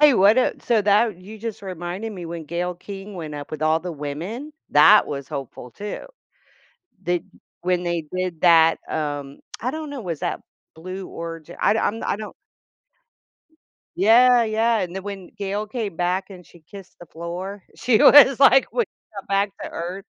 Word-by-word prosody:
Hey, 295 -3 +7
what, 205 +5 +5
uh - - +2
so 230 -3 +2
that 205 -1 +3
you 210 +4 -11
just 220 -2 -6
reminded 185 +4 -5
me 180 -3 -7
when 165 -1 -6
Gayle 175 +3 -3
King 195 +2 -9
went 155 -4 -6
up 145 -1 -7
with 155 0 -5
all 160 +1 +2
the 175 0 -5
women, 170 - -6 0.2
that 145 - +7
was 140 -1 -6
hopeful 135 -4 -7
too. 210 - -7 1.0
Did 175 -1 -1 0.4
when 180 0 0
they 170 -2 -2
did 185 -3 -3
that, 165 -2 +6
um 145 -2 -4 0.2
I 250 - -1
don't 310 0 -6
know, 280 - -6
was 170 -8 -5
that - - -2 0.3
Blue 185 +4 -7
Orig 165 -1 -8
I - - +3
I'm 225 0 -1
I - - 0
don't 215 -1 -8 1.6
Yeah, 240 +5 +6
yeah, 225 +1 +1
and 180 -3 -3
then 190 - -5
when 195 -3 -7
Gayle 205 +1 -3
came 210 -6 -4
back 185 +3 -1
and 180 -3 -12
she 170 - -18
kissed 190 +4 -13
the 175 - -11
floor, 180 +5 -7
she 240 -4 +2
was 275 -3 +8
like 270 -1 +7
w - - -31
when 240 -2 0 0.3
got 200 - -8
back 200 +1 +1
to - - -6
earth, 180 +4 -6
185 Hz, 180 wpm, -22 LUFS, 170-215 Hz, 1.6 s, was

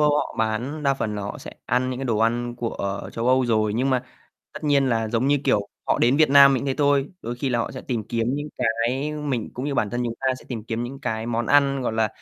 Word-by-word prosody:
Âu 150 0 +5
họ 150 - -2
bán 120 +7 -1
đa 140 -1 +2
phần 110 -5 -3
là 105 - -4
họ 100 - -5
sẽ - - -9 0.2
ăn 125 +1 +1
những 125 - -4
cái 135 - -3
đồ 115 -4 0
ăn 120 +1 0
của 100 -4 -3
châu 115 +1 -2
Âu 130 -1 +3
rồi, 110 -2 +1
nhưng 130 +3 +1
mà 130 -1 +1 0.5
tất - - -8
nhiên 140 -2 +3
là 115 -2 0
giống 115 +4 0
như, 145 0 +3
kiểu, 100 -1 +1 0.2
họ - - +2
đến 125 +4 +3
Việt 155 -2 +4
Nam 140 -1 +8
mình 130 - -2
thế 135 - 0
thôi, 140 -1 +3
đôi 120 +1 -4
khi 135 +2 -2
là 120 - 0
họ 115 - -1
sẽ 130 - -7
tìm 115 -5 -3
kiếm 120 +2 0
những 145 +1 -4
cái 125 +5 0
mình 145 -7 -3
cũng 125 - -4
như 145 -1 -2
bản 105 -5 0
thân 120 0 -2
chúng 115 - -2
ta 135 - -2
sẽ - - -16
tìm 115 -4 -5
kiếm 115 +1 -3
những 135 +3 -7
cái 110 -4 -3
món 115 -1 -1
ăn, 140 -2 +3
gọi 115 - -1
là 110 -1 +1
125 Hz, 280 wpm, -24 LUFS, 115-140 Hz, 0.5 s, Nam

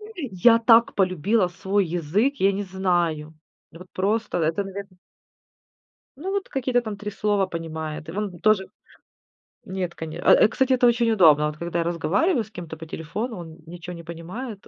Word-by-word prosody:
я 230 - +3
так 230 0 +5
полюбила 185 +2 +2
свой 195 +2 -1
язык, 175 - 0
я 195 +1 +3
не 200 +1 -3
знаю. 175 -5 -1 0.4
Вот 180 +3 -13
просто, 210 0 -1
это, 165 +5 0
наверно 195 -1 -8 1.2
Ну, 375 +6 -4
вот 400 -1 -2
какие-то 255 -2 0
там 215 -3 -6
3 210 +1 -6
слова 205 -1 +1
понимает. 160 -2 -6
И - - -5
вон 195 -3 -4
тоже 215 -3 +2 1.0
Нет, 185 -2 -4
коне 160 +1 -7
э, - - -5 0.2
э, - - +5
кстати, 265 +3 +1
это 245 -1 +3
очень 235 -1 +3
удобно: 155 -8 +5
вот 150 0 -4
когда 170 0 -2
я - - -1
разговариваю 195 - +1
с 215 - -19
кем-то 170 -5 -8
по 160 0 -10
телефону, 210 +10 -5
он 165 -1 -10
ничего 175 +1 -8
не 170 - -10
понимает. 190 +7 -7
190 Hz, 170 wpm, -24 LUFS, 170-220 Hz, 1.2 s, так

